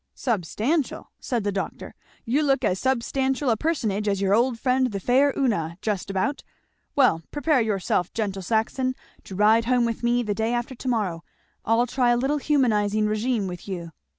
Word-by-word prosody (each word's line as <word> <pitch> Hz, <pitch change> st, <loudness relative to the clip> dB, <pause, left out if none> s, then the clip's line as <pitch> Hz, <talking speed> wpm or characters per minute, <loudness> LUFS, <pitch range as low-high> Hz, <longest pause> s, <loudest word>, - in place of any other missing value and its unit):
"Substantial!" 235 Hz, -, -1 dB
said 240 Hz, -4 st, -2 dB
the 205 Hz, -, 0 dB
doctor; 195 Hz, -1 st, -5 dB, 0.3 s
"you 265 Hz, +6 st, +1 dB
look 275 Hz, -3 st, +2 dB
as 185 Hz, -, +1 dB
substantial 265 Hz, +1 st, 0 dB
a -, -, +3 dB
personage 215 Hz, -8 st, -1 dB
as 200 Hz, -1 st, +1 dB
your 195 Hz, 0 st, +2 dB
old 235 Hz, +2 st, +2 dB
friend 255 Hz, +2 st, +2 dB
the 205 Hz, -5 st, -4 dB
'faire 260 Hz, +8 st, +3 dB
Una,' 170 Hz, -, 0 dB
just 205 Hz, -2 st, -2 dB
about. 195 Hz, +10 st, -1 dB, 0.5 s
Well 250 Hz, -, +4 dB
prepare 290 Hz, -2 st, +1 dB
yourself, 195 Hz, -4 st, 0 dB
gentle 200 Hz, -3 st, -3 dB
Saxon, 230 Hz, +6 st, 0 dB, 0.3 s
to 190 Hz, -, -9 dB
ride 220 Hz, +3 st, +4 dB
home 245 Hz, 0 st, +2 dB
with 230 Hz, -1 st, -3 dB
me 240 Hz, 0 st, +2 dB
the 210 Hz, -2 st, -1 dB
day 225 Hz, +3 st, -1 dB
after 240 Hz, +2 st, -3 dB
to 260 Hz, -, -8 dB
morrow. 200 Hz, -9 st, -1 dB, 0.4 s
I'll 225 Hz, +2 st, +3 dB
try 250 Hz, 0 st, +1 dB
a 240 Hz, -, +4 dB
little 275 Hz, +4 st, 0 dB
humanizing 215 Hz, -8 st, +2 dB
regimen 215 Hz, 0 st, 0 dB
with 180 Hz, +1 st, -8 dB
you." 175 Hz, -4 st, -5 dB
230 Hz, 180 wpm, -24 LUFS, 205-260 Hz, 0.5 s, Well